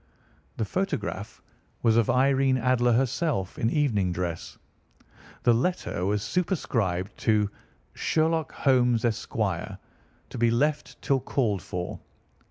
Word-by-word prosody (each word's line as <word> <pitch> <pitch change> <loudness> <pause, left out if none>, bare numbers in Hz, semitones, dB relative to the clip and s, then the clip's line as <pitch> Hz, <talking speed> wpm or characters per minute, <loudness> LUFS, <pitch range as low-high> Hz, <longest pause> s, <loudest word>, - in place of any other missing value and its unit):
The 110 - 0
photograph 105 - -3 0.4
was 115 -2 +4
of 115 -2 +3
Irene 135 0 +3
Adler 125 -1 +2
herself 125 - 0
in 115 - +2
evening 110 - +1
dress, 85 -1 -4 0.9
the 120 - +5
letter 115 - -1
was 105 0 0
superscribed 105 - -1
to 105 -2 +2 0.4
"Sherlock 160 -1 0
Holmes, 125 -3 +2
Esq. 115 -2 -2
To - - -5
be 120 0 +4
left 145 +6 0
till 135 -2 +2
called 115 -7 0
for." 90 -1 -5
120 Hz, 115 wpm, -27 LUFS, 105-135 Hz, 0.9 s, the